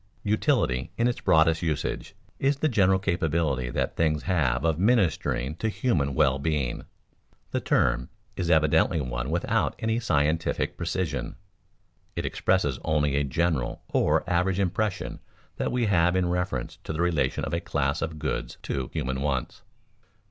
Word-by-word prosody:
Utility, 105 - +1
in 115 - +3
its 120 - -2
broadest 80 +1 +4
usage, 80 -4 -2 0.2
is 135 +1 +2
the 155 - +1
general 95 -8 +3
capability 80 -8 0
that - - -2
things 75 -2 +1
have 80 -6 +1
of 80 -1 +1
ministering 90 - +1
to 110 - -1
human 75 - 0
well 70 -2 +3
being. 70 -4 -1 0.7
The - - 0
term - - +1 0.3
is 90 -2 -2
evidently 80 0 +3
one - - -3
without 85 +2 0
any 110 +1 0
scientific 80 -7 0
precision. 80 -7 -3 0.8
It - - -2
expresses - - +1
only 75 -2 +1
a 70 - +2
general 75 -1 -1
or - - +2
average 90 +2 +1
impression 100 +1 -1 0.4
that - - -1
we 125 -2 +1
have 90 -3 +3
in 90 -1 +1
reference 90 -9 -2
to - - -4
the 80 - -2
relation 85 -4 0
of - - -5
a 85 - +1
class 75 -2 -1
of 80 -1 -3
goods - - -3
to 65 -2 -3
human 65 +1 -2
wants. 70 -4 -2
80 Hz, 150 wpm, -26 LUFS, 70-95 Hz, 0.8 s, broadest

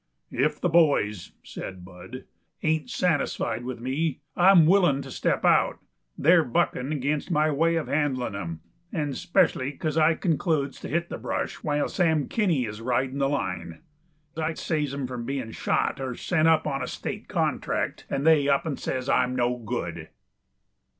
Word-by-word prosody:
"If 145 +5 0
the - - +1
boys," 145 - +2
said 95 -2 -8
Bud, 90 +7 -10 0.4
"ain't 160 +7 0
satisfied 145 - 0
with 125 -1 -5
me, 135 +4 -2
I'm 180 -2 +7
willing 165 -6 +4
to 135 - -9
step - - 0
out. - - +4 0.4
They're 165 +2 +5
buckin' 125 +1 0
against 145 +2 -1
my 155 -2 +2
way 165 +3 +2
of 165 - -1
handlin' 135 -7 -1
'em. 85 -5 -5 0.3
And 150 -5 -2
'specially 175 -7 +1
because 155 +2 -3
I 160 +1 +4
concludes 155 -5 0
to - - -7
hit 170 +2 -1
the - - -5
brush - - -3
while 145 -2 0
Sam 160 -5 +1
Kinney 175 - +1
is 105 0 -7
ridin' 130 +3 -1
the 135 0 +2
line. 90 - -3 0.5
I 160 0 -2
saves 150 -4 -1
'em 140 -1 -3
from 125 -2 -5
bein' 130 -4 -3
shot 135 - -1
or 130 -2 -3
sent 160 +3 +1
up 160 -1 +4
on 135 -3 -2
a 125 - -3
state - - -6
contract, - - -2
and 140 +2 -2
they 150 -3 +5
up 140 +2 +2
and 155 -4 -3
says 130 0 -3
I'm 125 -1 +2
no 125 0 +1
good." 110 -3 -5
140 Hz, 170 wpm, -26 LUFS, 125-160 Hz, 0.5 s, I'm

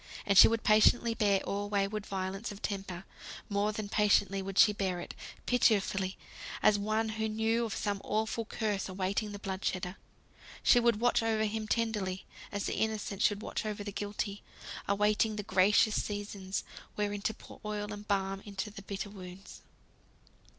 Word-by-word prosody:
And 200 -1 +2
she - - +11
would 225 0 0
patiently 230 +2 +5
bear 200 -3 +2
all 205 +1 -3
wayward 205 +1 -1
violence 195 +3 -3
of 205 - -9
temper; 195 -3 -4 0.4
more 205 +1 +1
than 215 -1 -4
patiently 200 -2 +3
would 195 0 -6
she 210 -2 +7
bear 190 -3 -1
it - - -7 0.3
pitifully, 195 -5 +2 0.5
as 205 -1 +5
one 215 +2 0
who 220 0 -2
knew 225 +2 +1
of 220 - -4
some 200 -1 -2
awful 220 +2 -1
curse 215 -3 -2
awaiting 195 +3 -1
the 205 - -6
blood 195 -1 -5
shedder. 185 0 -2 0.7
She 245 - +6
would 235 -3 +3
watch 245 -1 +3
over 220 -1 +1
him 215 0 -3
tenderly, 210 -5 -1 0.3
as 205 -1 -2
the - - -2
Innocent 215 -2 -1
should 210 -2 +2
watch - - -3
over 210 -1 -4
the 205 - -5
Guilty; 205 0 -3 0.5
awaiting 210 +2 +2
the 210 - -3
gracious 200 +3 +4
seasons, 200 -2 -4 0.3
wherein 205 -1 -1
to 220 - 0
pour - - -13
oil 210 0 -3
and 205 0 -9
balm 195 -1 0
into 205 +1 -5
the 200 - -9
bitter 200 +1 -5
wounds. 185 -1 -10
205 Hz, 170 wpm, -31 LUFS, 195-215 Hz, 0.7 s, she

